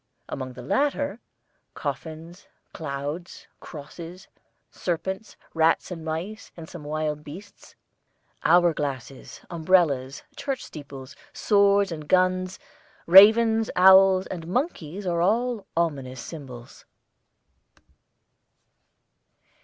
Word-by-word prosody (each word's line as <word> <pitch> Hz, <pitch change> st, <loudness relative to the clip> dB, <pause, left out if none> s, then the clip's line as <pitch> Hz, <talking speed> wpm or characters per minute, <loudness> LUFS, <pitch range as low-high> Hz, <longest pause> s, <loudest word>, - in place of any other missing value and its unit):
Among 130 Hz, -1 st, -6 dB
the 125 Hz, 0 st, -10 dB
latter, 285 Hz, -, -1 dB, 0.6 s
coffins, 165 Hz, +3 st, -7 dB, 0.3 s
clouds, 145 Hz, +3 st, -6 dB
crosses, 170 Hz, +4 st, -10 dB, 0.4 s
serpents, 190 Hz, +4 st, -4 dB, 0.2 s
rats 165 Hz, +2 st, +2 dB
and 165 Hz, -3 st, -6 dB
mice 170 Hz, +8 st, -5 dB
and 165 Hz, -1 st, -9 dB
some 170 Hz, -3 st, -10 dB
wild 150 Hz, 0 st, -3 dB
beasts, 195 Hz, +8 st, -12 dB, 0.7 s
hour 175 Hz, -1 st, +5 dB
glasses, 135 Hz, -3 st, -6 dB
umbrellas, 160 Hz, -6 st, +1 dB
church 275 Hz, -2 st, -4 dB
steeples, 140 Hz, -3 st, -10 dB, 0.2 s
swords 200 Hz, -2 st, +3 dB
and 155 Hz, -2 st, -7 dB
guns, 185 Hz, +1 st, +1 dB, 0.5 s
ravens, 220 Hz, +4 st, +7 dB
owls, 190 Hz, 0 st, +6 dB
and 165 Hz, -3 st, -7 dB
monkeys 195 Hz, -, -3 dB
are 170 Hz, -2 st, 0 dB
all 225 Hz, +3 st, 0 dB
ominous 135 Hz, -7 st, -2 dB
symbols. 125 Hz, -4 st, -10 dB
170 Hz, 90 wpm, -25 LUFS, 150-195 Hz, 0.7 s, ravens